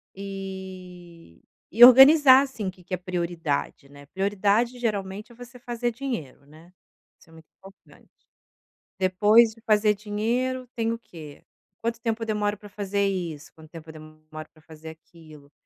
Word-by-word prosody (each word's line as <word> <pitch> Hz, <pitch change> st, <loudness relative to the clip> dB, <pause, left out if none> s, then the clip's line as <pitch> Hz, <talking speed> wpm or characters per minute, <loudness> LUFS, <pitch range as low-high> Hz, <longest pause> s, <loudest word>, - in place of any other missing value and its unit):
e 185 Hz, -, -10 dB, 0.3 s
e 235 Hz, -, +7 dB
organizar, 270 Hz, +2 st, +8 dB
assim, 230 Hz, -8 st, -6 dB
o -, -, -3 dB
que 180 Hz, -1 st, -21 dB
que 185 Hz, -, -10 dB
é -, -, 0 dB
prioridade, 170 Hz, -6 st, -4 dB
né, 145 Hz, 0 st, -15 dB
prioridade 205 Hz, +6 st, -1 dB
geralmente 210 Hz, -1 st, -4 dB
é -, -, -17 dB
você 245 Hz, +1 st, -13 dB
fazer 240 Hz, 0 st, -4 dB
dinheiro, 225 Hz, -, -7 dB
né. 160 Hz, +4 st, -19 dB, 0.5 s
Isso 165 Hz, -, -23 dB
é -, -, -19 dB
muito 160 Hz, -1 st, -17 dB
importante. 195 Hz, +1 st, -19 dB, 0.9 s
Depois 210 Hz, +5 st, +4 dB
de 225 Hz, -, -21 dB
fazer 210 Hz, -1 st, +2 dB
dinheiro 235 Hz, +5 st, -3 dB
tem 225 Hz, -1 st, -1 dB
o 230 Hz, -, -7 dB
quê? 155 Hz, -9 st, -13 dB, 0.4 s
Quanto 230 Hz, 0 st, -3 dB
tempo 225 Hz, 0 st, -3 dB
eu -, -, -7 dB
demoro 210 Hz, -1 st, -2 dB
para 205 Hz, -, -13 dB
fazer 200 Hz, 0 st, -2 dB
isso? 170 Hz, -6 st, -5 dB
Quanto 160 Hz, -1 st, -16 dB
tempo 165 Hz, -1 st, -12 dB
eu 160 Hz, -, -10 dB
demoro 155 Hz, 0 st, -12 dB
para 155 Hz, -, -23 dB
fazer 160 Hz, 0 st, -13 dB
aquilo? 155 Hz, -2 st, -17 dB
195 Hz, 160 wpm, -24 LUFS, 165-225 Hz, 0.9 s, organizar